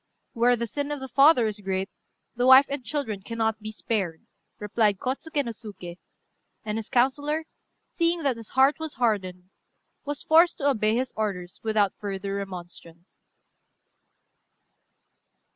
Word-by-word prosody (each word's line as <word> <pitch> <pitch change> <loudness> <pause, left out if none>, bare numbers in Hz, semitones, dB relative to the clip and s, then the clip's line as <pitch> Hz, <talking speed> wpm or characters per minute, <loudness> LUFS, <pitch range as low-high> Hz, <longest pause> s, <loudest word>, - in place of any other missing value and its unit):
"Where 240 +1 +3
the 235 0 -3
sin 285 +5 -4
of 295 -1 -3
the 265 - -6
father 275 0 +5
is 215 -1 -3
great, 190 -1 -2 0.5
the 245 +1 +1
wife 260 +2 +9
and 280 -2 -4
children 235 -7 -3
cannot 225 +1 -2
be 215 0 -6
spared," 195 -7 -3 0.3
replied 210 -1 +1
Kôtsuké 280 - -2
no 235 - -3
Suké; 200 -6 -9 0.7
and 215 +1 -2
his 220 - -8
councillor, 290 +5 +1 0.4
seeing 335 -1 0
that 275 -3 +1
his 230 -2 -10
heart 270 +4 +5
was 315 -2 -5
hardened, 185 -6 -1 0.5
was 290 0 -5
forced 335 +2 +5
to 285 - 0
obey 215 -5 +2
his 255 +1 -2
orders 185 -5 -4
without 210 -3 +1
further 195 -1 -4
remonstrance. 175 -3 -9
225 Hz, 145 wpm, -26 LUFS, 200-275 Hz, 0.7 s, wife